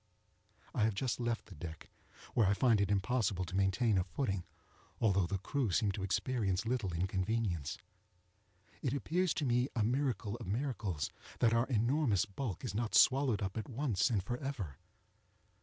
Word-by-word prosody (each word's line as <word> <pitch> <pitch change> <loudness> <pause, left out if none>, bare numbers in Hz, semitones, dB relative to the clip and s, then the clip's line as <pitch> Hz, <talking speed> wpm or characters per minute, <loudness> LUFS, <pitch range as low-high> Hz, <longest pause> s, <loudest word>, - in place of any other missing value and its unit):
I - - 0
have 110 -1 +2
just 125 +4 -1
left 120 -1 -1
the - - -12
deck, 80 0 -8 0.4
where 110 -5 +4
I 100 - +3
find 115 -3 +4
it 100 - +1
impossible 100 -2 +1
to 90 - -6
maintain 95 +2 +3
a - - +1
footing, 95 -6 -2 0.5
although 100 -5 +3
the 100 - -1
crew 125 +5 -1
seem 100 +3 +2
to 95 - -5
experience 100 0 0
little 115 -5 0
inconvenience. 90 -2 -1 1.0
It 130 -3 0
appears 175 +5 0
to 150 - -1
me 125 0 +2
a 110 - +2
miracle 120 -3 0
of 115 - -8
miracles 105 - -2 0.3
that 115 -1 +3
our 115 +2 +3
enormous 120 -2 +2
bulk 100 -1 -4
is - - -3
not 115 +1 -1
swallowed 130 -5 +5
up 95 +2 -3
at 110 - -4
once 125 -5 +1
and 105 -6 +1
forever. 120 - -4
110 Hz, 165 wpm, -34 LUFS, 95-125 Hz, 1.0 s, swallowed